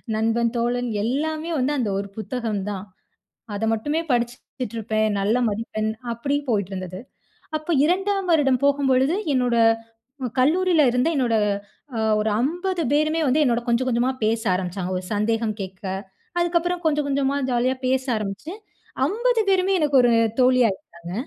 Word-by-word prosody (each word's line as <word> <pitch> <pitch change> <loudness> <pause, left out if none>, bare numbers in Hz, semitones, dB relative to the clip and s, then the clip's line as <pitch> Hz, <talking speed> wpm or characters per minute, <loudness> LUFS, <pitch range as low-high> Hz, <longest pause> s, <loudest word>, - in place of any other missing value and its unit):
நண்பன், 225 +1 +1
தோழன், 240 +1 0
எல்லாமே 310 +7 -1
வந்து 265 +3 +1
அந்த 240 -6 0
ஒரு 200 - -4
புத்தகம் 220 -3 -3
தான். 200 -1 -5 0.7
அத 220 - -1
மட்டுமே 295 +9 -1
படிச்சுட்ருப்பேன். 235 -2 -2
நல்ல 210 +5 +2
மதிப்பெண் 215 0 -2 0.2
அப்டி 280 +5 -1
போயிட்ருந்தது. 190 -3 -2 0.6
அப்ப 310 +3 -5
2ஆம் 385 +2 0
வருடம் 275 -5 +3
போகும்பொழுது, 275 +1 +3 0.2
என்னோட 245 -2 +1 0.9
கல்லூரியிலருந்த 305 -4 +3
என்னோட 240 -4 +2 0.6
அ - - 0 0.2
ஒரு 215 +1 +1
50 350 +6 -1
பேருமே 310 +2 +2
வந்து 265 +4 +3
என்னோட 240 -3 +1
கொஞ்சம் 240 +2 +1
கொஞ்சமா 245 +2 +1
பேச 225 +1 +1
ஆரம்பிச்சாங்க, 185 0 -3
ஒரு 180 - -5
சந்தேகம் 220 +1 0
கேக்க. 190 +1 -8 0.6
அதுக்கப்பறம் 345 0 0
கொஞ்சம் 300 -2 +2
கொஞ்சமா 280 0 +1
ஜாலியா 250 +1 +1
பேச 260 0 +1
ஆரம்பிச்சுட்டு, 215 - -4 0.5
50 465 - +1
பேருமே 380 0 +3
எனக்கு 295 -2 +1
ஒரு 245 -1 +4 0.3
தோழி 255 0 +5
ஆயிட்டாங்க. 170 -3 -7
250 Hz, 135 wpm, -23 LUFS, 220-305 Hz, 0.9 s, தோழி